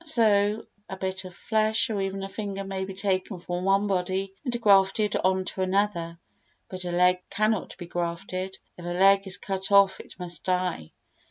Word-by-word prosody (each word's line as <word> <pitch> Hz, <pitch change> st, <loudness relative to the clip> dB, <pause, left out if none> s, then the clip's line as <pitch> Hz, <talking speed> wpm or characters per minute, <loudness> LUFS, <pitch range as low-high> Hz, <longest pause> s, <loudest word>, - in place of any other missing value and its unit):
So 215 Hz, -7 st, +3 dB, 0.2 s
a 190 Hz, -, -6 dB
bit 190 Hz, 0 st, -3 dB
of 180 Hz, -1 st, -10 dB
flesh 220 Hz, +2 st, +2 dB
or 205 Hz, -2 st, -1 dB
even 195 Hz, 0 st, -3 dB
a -, -, -3 dB
finger 195 Hz, -1 st, -5 dB
may 195 Hz, -1 st, -4 dB
be 190 Hz, 0 st, -8 dB
taken 190 Hz, -1 st, -1 dB
from 175 Hz, +1 st, -4 dB
one 195 Hz, +1 st, +3 dB
body 190 Hz, 0 st, -1 dB
and 245 Hz, -3 st, -2 dB
grafted 200 Hz, 0 st, +4 dB
on 185 Hz, 0 st, +1 dB
to 190 Hz, -, -4 dB
another, 185 Hz, -3 st, 0 dB, 0.5 s
but 185 Hz, -1 st, -6 dB
a 175 Hz, -, -2 dB
leg 180 Hz, +1 st, +3 dB
cannot 215 Hz, -1 st, 0 dB
be 175 Hz, -, -7 dB
grafted; 175 Hz, +2 st, -4 dB, 0.2 s
if -, -, -9 dB
a 175 Hz, 0 st, -3 dB
leg 195 Hz, +1 st, +5 dB
is 185 Hz, -1 st, +1 dB
cut 195 Hz, 0 st, -3 dB
off 200 Hz, -1 st, +5 dB
it -, -, -12 dB
must 175 Hz, -3 st, -3 dB
die. 180 Hz, -, -1 dB
190 Hz, 185 wpm, -26 LUFS, 185-200 Hz, 0.5 s, leg